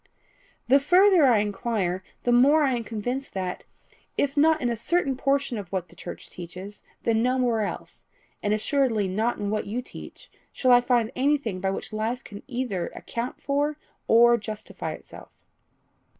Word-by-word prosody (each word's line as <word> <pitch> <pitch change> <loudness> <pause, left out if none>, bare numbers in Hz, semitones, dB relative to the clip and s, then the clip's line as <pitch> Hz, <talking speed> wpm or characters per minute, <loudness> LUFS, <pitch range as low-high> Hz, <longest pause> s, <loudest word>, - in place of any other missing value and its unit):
"The 270 +3 +6
further 360 +1 +5
I 240 -3 +5
inquire, 205 -3 -1 0.2
the 245 - +2
more 280 +6 +5
am 265 -3 +2
I - - -3
convinced 235 +4 -4
that, 185 -1 -4 0.5
if 280 0 0
not 315 +2 +4
in 245 -4 0
a - - -1
certain 275 +3 0
portion 275 -3 0
of 190 -4 -9
what 180 -3 -3
the - - -18
church - - -9
teaches, 180 +4 -9 0.2
then 225 -1 +2
nowhere 250 -2 +1
else, 205 - -6 0.3
and 205 - 0
assuredly 220 -1 +1
not 220 +6 0
in 205 -1 -3
what 215 -1 -2
you 220 +5 -2
teach, - - -12 0.2
shall 255 - +2
I 245 0 +7
find 240 -2 +1
anything 265 -8 0
by 190 - 0
which 195 - -5
life 225 +4 -2
can 205 0 -10
either 240 -9 -2
account 235 +2 -5
for 290 +1 0 0.3
or 235 +1 +6
justify 215 0 -6
itself." - - -12
240 Hz, 165 wpm, -26 LUFS, 210-275 Hz, 0.5 s, I